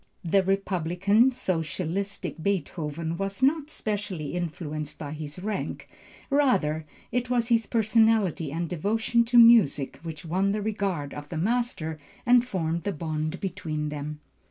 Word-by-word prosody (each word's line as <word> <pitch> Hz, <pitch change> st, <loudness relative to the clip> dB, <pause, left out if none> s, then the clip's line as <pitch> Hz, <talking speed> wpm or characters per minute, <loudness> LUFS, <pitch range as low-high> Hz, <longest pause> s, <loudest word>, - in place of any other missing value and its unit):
The 195 Hz, +4 st, +4 dB
republican, 195 Hz, +3 st, +2 dB
socialistic 185 Hz, -, -3 dB
Beethoven 165 Hz, -3 st, -2 dB
was 195 Hz, +5 st, -3 dB
not 295 Hz, +2 st, +3 dB
specially 200 Hz, -, -4 dB
influenced 155 Hz, -3 st, -4 dB
by 145 Hz, -2 st, -6 dB
his 150 Hz, 0 st, -6 dB
rank; 200 Hz, +2 st, -4 dB, 0.4 s
rather, 185 Hz, -, +2 dB, 0.2 s
it 245 Hz, 0 st, -1 dB
was 240 Hz, -1 st, +1 dB
his 230 Hz, -3 st, +3 dB
personality 220 Hz, -8 st, +2 dB
and 170 Hz, +3 st, -2 dB
devotion 220 Hz, +7 st, +1 dB
to 240 Hz, +1 st, +2 dB
music, 225 Hz, -, +6 dB
which 165 Hz, 0 st, -7 dB
won 190 Hz, +4 st, +1 dB
the 210 Hz, -, -1 dB
regard 195 Hz, -9 st, -2 dB
of 145 Hz, 0 st, -8 dB
the 165 Hz, -, -4 dB
master 190 Hz, -6 st, -1 dB, 0.3 s
and 245 Hz, 0 st, +6 dB
formed 170 Hz, -8 st, -2 dB
the 200 Hz, -, -2 dB
bond 155 Hz, +1 st, -3 dB
between 155 Hz, -5 st, -3 dB
them. 150 Hz, 0 st, -5 dB
185 Hz, 135 wpm, -27 LUFS, 155-220 Hz, 0.4 s, music